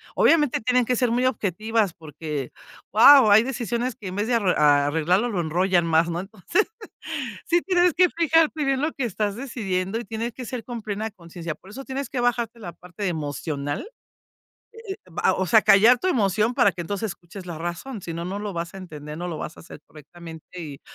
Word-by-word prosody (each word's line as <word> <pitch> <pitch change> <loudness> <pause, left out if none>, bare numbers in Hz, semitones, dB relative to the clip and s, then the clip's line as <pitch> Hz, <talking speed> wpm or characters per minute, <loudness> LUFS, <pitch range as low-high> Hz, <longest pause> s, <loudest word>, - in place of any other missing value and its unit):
Obviamente, 300 -8 +3
tienen 250 +1 +2
que 250 - +1
ser 245 0 +1
muy 245 +2 +1
objetivas, 215 -3 0
porque, 150 -4 -6 0.4
¡guau! 235 0 +8
Hay 215 +2 +8
decisiones, 240 -1 -2
que 200 - -9
en 185 - -7
vez 205 +2 -1
de 245 - +2
arr 200 -5 +1
arreglarlo, 150 +8 +3
lo 185 -6 -1
enrollan 175 +1 +1
más 165 +1 +3
¿no? 170 0 -2
Entonces, 205 - -1 0.8
sí 345 +1 +2
tienes 360 -3 +3
que 360 -1 +4
fijarte 320 -2 +2
bien, 270 0 +1
lo 310 +2 0
que 265 - -3
estás 205 -1 -2
decidiendo, 200 -6 -3
y 240 - -4
tiene 230 +1 -4
que 255 - -8
ser, 240 0 -6
con 240 -2 -6
plena 215 +1 -3
consciencia. 170 -4 -8
Por 190 - -18
eso, 265 +6 -9
tienes 265 -1 -4
que 260 - -3
bajarte, 240 -1 0
la 175 -6 -8
parte 180 +3 -6
emocional. 145 - -3 1.0
Eh 385 - -4
eh, - - -19
va 180 +3 +1
o 190 0 -1
sea, 220 +4 +5
callar 225 +5 +6
tu 370 - -3
emoción, 215 - +2
para 245 -6 +4
que 175 +1 -5
entonces, 200 +2 -3
escuches 180 +2 -12
la 170 -2 -6
razón. 175 +7 -5
Si 165 - -5
no, 170 +1 -5
no 195 +2 -4
lo 205 -1 -4
vas 170 +2 -5
a - - -7
entender, 150 -4 -8
no 175 +1 -4
lo 165 -3 -5
vas 155 - -6
a - - -12
hacer 150 - -12
correctamente. 160 +1 -12 0.2
Y 145 -4 -8
205 Hz, 210 wpm, -24 LUFS, 170-245 Hz, 1.0 s, guau